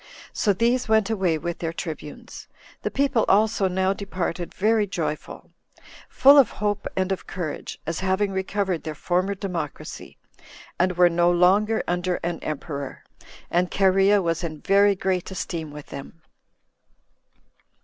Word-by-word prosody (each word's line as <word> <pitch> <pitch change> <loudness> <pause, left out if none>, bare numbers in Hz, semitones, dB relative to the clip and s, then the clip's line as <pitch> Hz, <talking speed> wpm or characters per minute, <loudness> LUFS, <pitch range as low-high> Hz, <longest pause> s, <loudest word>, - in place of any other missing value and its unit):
So 210 - +2
these 235 +4 +1
went 220 -1 +3
away 190 -7 +1
with 170 +2 -4
their 165 -1 -2
tribunes. 160 -3 -8 0.3
The - - -2
people 270 -5 +1
also 210 -1 +3
now 190 +1 +1
departed 185 -3 -4
very 215 +1 +2
joyful, 165 -5 -5 0.6
full 280 +2 +7
of 260 - +5
hope 205 0 -2
and 190 0 0
of 190 - -3
courage, 165 -6 -5
as 165 +1 -3
having 190 +1 0
recovered 190 -2 -1
their 155 -1 -6
former 185 +6 0
democracy, 175 -7 -6 0.6
and 180 +1 +2
were 180 0 +7
no 175 0 +3
longer 195 +5 +3
under 180 0 0
an 170 -1 -2
emperor; 140 -2 -5 0.5
and 175 +1 +2
Cherea 195 +1 +3
was 165 0 -1
in 155 -3 -5
very 200 +1 +4
great 185 -1 -1
esteem 170 -4 -4
with 145 0 -10
them. 155 +4 -10
185 Hz, 140 wpm, -24 LUFS, 170-200 Hz, 0.6 s, full